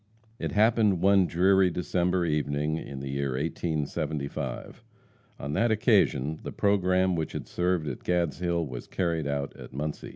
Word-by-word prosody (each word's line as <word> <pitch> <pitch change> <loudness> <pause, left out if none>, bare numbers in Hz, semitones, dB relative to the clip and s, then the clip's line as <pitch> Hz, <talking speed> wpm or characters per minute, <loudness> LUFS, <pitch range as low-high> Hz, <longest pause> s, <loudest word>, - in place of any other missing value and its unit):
It - - -3
happened 105 -3 +3
one 95 -2 +5
dreary 95 +2 +4
December 90 +1 0
evening 75 0 0
in 70 -4 -7
the 70 - -5
year 70 -1 -1
1875. 75 0 -3 0.6
On 70 +2 -4
that 115 +8 +2
occasion 95 - +2
the - - -6
programme 95 -2 +2
which 80 -2 -3
had - - -5
served 90 -3 0
at - - -4
Gadshill 85 -1 0
was 65 -2 -7
carried 85 -4 -1
out 70 -1 -3
at - - -11
Muncie. 75 +3 -4
85 Hz, 150 wpm, -28 LUFS, 75-95 Hz, 0.6 s, one